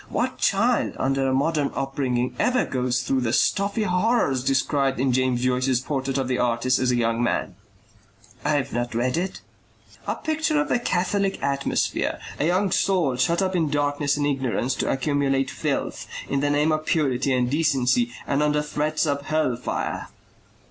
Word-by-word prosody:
What - - -2
child - - +2
under 135 0 0
a - - +1
modern 145 +2 +1
upbringing 130 -2 -1
ever 250 0 +2
goes 125 -1 -1
through 130 0 0
the 115 -2 0
stuffy 200 - +1
horrors 180 - +1
described 135 0 +1
in 130 0 +2
James 130 -1 +1
Joyce's 130 0 +1
PORTRAIT 135 0 -2
OF 135 -2 -1
THE 125 -1 -1
ARTIST 125 +1 +1
AS 130 0 +1
A 125 - +2
YOUNG 115 0 +1
MAN." 120 - -1 0.9
"I've 145 -4 0
not 120 0 -2
read 125 +2 0
it." 180 +3 -3 0.7
"A - - 0
picture 315 -1 0
of 295 - -1
the - - +2
Catholic 195 -2 0
atmosphere; 140 0 0 0.2
a 150 - +1
young 185 +2 +1
soul 180 -9 +2
shut 170 +9 +1
up 190 0 -1
in 160 -4 +1
darkness 145 0 0
and 145 - 0
ignorance 135 -2 0
to - - -1
accumulate 135 -1 0
filth. - - -3 0.2
In 140 - 0
the 145 +1 +1
name 145 +2 +2
of 155 0 -1
purity 135 -4 +1
and 125 -1 +1
decency 125 -4 +1
and 140 +1 0
under 150 0 +2
threats 150 +2 -1
of 140 -1 -2
hell 155 -5 +1
fire." 125 - -3
140 Hz, 170 wpm, -24 LUFS, 130-155 Hz, 0.9 s, child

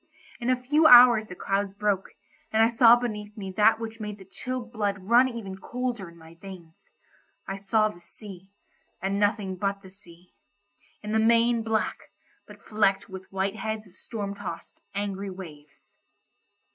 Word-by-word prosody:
In 240 0 -2
a 255 -1 +2
few 300 +5 +3
hours 240 -4 +8
the 180 - -9
clouds 195 +1 -2
broke, 200 -2 -1 0.4
and 220 0 +4
I 225 - +4
saw 235 0 +7
beneath 215 -3 -5
me 195 -2 -6
that 215 +3 +4
which 225 0 -7
made 210 -1 -6
the 190 - -14
chilled 245 +4 -6
blood 205 -3 -1
run 230 0 +1
colder 240 -5 -4
in 170 - -17
my 160 0 -15
veins. 170 -2 -13 0.6
I 195 - -4
saw 215 +2 +2
the 210 -5 -10
sea, 195 0 -12 0.5
and 195 +1 -2
nothing 205 -2 0
but 200 +1 -2
the 190 - -13
sea; 180 -2 -16 0.7
in 210 - -5
the 220 - +2
main 230 +1 +3
black, 220 -1 -2 0.4
but - - -15
flecked 205 -2 0
with 190 0 -10
white 195 +2 -2
heads 220 0 -4
of 185 - -20
storm 200 0 -5
tossed, 200 -4 -8
angry 200 -1 -3
waves. 155 -6 -12
205 Hz, 165 wpm, -26 LUFS, 190-225 Hz, 0.7 s, hours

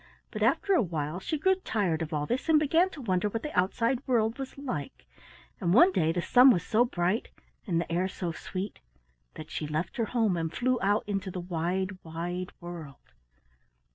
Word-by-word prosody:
But - - -6
after 400 -1 +2
a 360 - +5
while 160 -3 -3
she 310 +11 -2
grew 380 +6 +3
tired 205 - -1
of 160 0 -4
all 150 -2 -1
this 250 - -2
and 315 - +6
began 325 +5 +3
to 320 -6 -10
wonder 190 -1 +1
what 225 +2 -4
the 300 - -5
outside 230 +7 +1
world 230 0 +1
was 270 0 -6
like, 155 - -5 0.5
and 175 +2 +1
one 345 +8 +8
the - - -7
day 160 0 +3
the 175 +1 -2
sun 250 +2 +7
was 180 -8 +3
so 230 +1 +3
bright 185 0 -1 0.4
and 170 -4 +1
the 170 - -4
air 180 +3 +1
so 180 -2 -4
sweet 185 +4 -6 0.6
that 155 - -9
she 150 - -3
left 155 +3 -3
her 230 - +1
home 220 -5 +1
and 165 -1 -2
flew 255 0 +1
out 205 +2 +2
into 195 -2 -2
the 185 - -5
wide, 180 +2 -2
wide 175 +3 -4
world. 170 -6 -10
190 Hz, 200 wpm, -29 LUFS, 170-245 Hz, 0.6 s, one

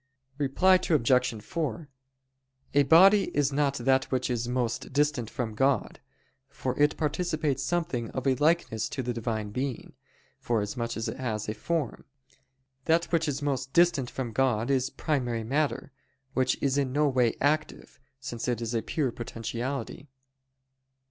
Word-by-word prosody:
Reply 180 +7 +4
Obj. 125 -6 +2
4: 155 +1 -3 0.9
A 145 - +5
body 190 +7 +7
is 145 -1 +2
not 140 -1 +1
that 130 +1 +2
which 130 -1 -1
is 120 -1 -1
most 120 -1 -2
distant 140 -5 +1
from 120 -5 -4
God; 135 0 +1 0.5
for 130 -2 -3
it 150 0 +3
participates 155 -3 -1
something 140 -6 -1
of 130 - -5
a 135 - +4
likeness 145 -6 +1
to 130 - -4
the 125 0 -2
Divine 110 -3 -3
Being, 130 +2 -4 0.5
forasmuch 115 +1 -2
as 110 - -3
it - - -4
has 110 -5 -3
a 110 - -2
form. 150 +4 -3 0.8
That 165 +1 +2
which 165 -2 +2
is 145 0 -2
most 135 -2 -2
distant 170 -7 +3
from 125 -3 -4
God 125 0 +1
is 130 -1 +1
primary 125 -5 -2
matter; 140 +4 -1 0.4
which 130 -1 +1
is 140 0 +2
in 135 -2 0
no 150 +2 +2
way 125 -4 +2
active, 155 +2 -1 0.2
since 120 -3 -5
it 120 -3 0
is 115 0 -3
a 115 - +1
pure 140 -1 -1
potentiality. 120 +5 -5
130 Hz, 150 wpm, -28 LUFS, 120-145 Hz, 0.9 s, body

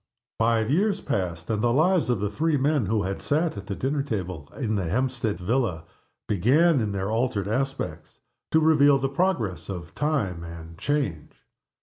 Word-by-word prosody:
Five 115 +1 +2
years 200 +5 +2
passed 90 -3 -3
and 105 -1 0
the 120 0 +2
lives 160 +4 +3
of 120 -5 +1
the 105 0 -1
three 155 +6 +1
men 140 -4 +1
who 105 0 +1
had 95 +1 -3
sat 155 +1 0
at 100 -1 -8
the 100 - -3
dinner 140 +5 -1
table 95 - -4
in 115 -6 -1
the 100 -4 0
Hampstead 120 -1 -1
villa 95 -4 -1 0.4
began, 135 - +4
in 105 -2 -1
their 100 +1 -2
altered 110 -4 0
aspects, 135 +5 -3 0.3
to 160 - +4
reveal 145 -3 +5
the 135 0 -1
progress 135 - -1
of 85 -3 -6
time 110 - -1
and 85 0 -9
change. 120 - -2
115 Hz, 170 wpm, -25 LUFS, 95-145 Hz, 0.4 s, reveal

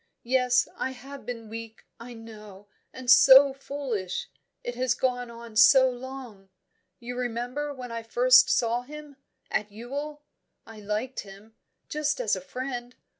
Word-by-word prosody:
Yes, 250 0 +2
I 260 - -3
have 270 -1 -11
been 230 -2 -6
weak, 225 0 -9
I 240 +1 -10
know, 210 -3 -12 0.2
and 255 -1 -10
so 265 +2 +8
foolish! 255 - -5 0.3
It 245 - -4
has 250 0 0
gone 245 -2 -1
on 235 -1 -11
so 260 +3 +7
long. 245 -6 -10 0.5
You 245 +1 -7
remember 250 +4 -3
when 250 -3 -8
I 230 0 -4
first 250 +3 +5
saw 240 -1 +1
him, 295 +1 -11 0.3
at 210 0 -1
Ewell? 285 +7 -6 0.4
I 225 -1 -12
liked 215 +5 -3
him, 200 +2 -11 0.3
just 300 +6 -1
as - - +1
a - - -6
friend. 255 -2 -6
245 Hz, 145 wpm, -27 LUFS, 225-265 Hz, 0.5 s, so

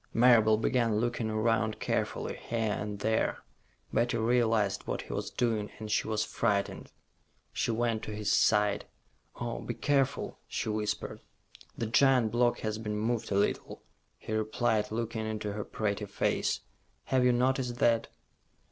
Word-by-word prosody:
Marable 115 -2 +6
began 115 -1 +1
looking 120 0 0
around 110 0 +1
carefully, - - -2
here 115 -2 -2
and 105 -1 -4
there. 110 +1 0 0.5
Betty 120 +1 +2
realized 115 -3 +1
what - - -2
he - - -7
was - - -3
doing, 110 -4 0
and 110 -1 -6
she - - +1
was 110 -1 0
frightened. 100 -4 -1 0.6
She - - -1
went 115 -1 0
to 105 - -6
his 105 -1 -1
side. 105 -2 +3 0.5
"Oh, - - -4
be - - -5
careful," 140 -1 0
she - - -3
whispered. 105 0 -2 0.6
"The 115 - -1
giant 125 0 +4
block 120 +1 +2
has 110 0 -2
been 105 -1 -3
moved 115 +1 -1
a - - +1
little," 100 - -1 0.3
he 110 - -6
replied, 110 0 +1
looking 110 0 -3
into 105 -1 -3
her 105 0 -3
pretty 105 -1 -2
face. 100 - 0 0.4
"Have 130 -1 +2
you 125 - +5
noticed 125 0 +1
that?" 115 -2 +3
110 Hz, 150 wpm, -30 LUFS, 105-120 Hz, 0.6 s, Marable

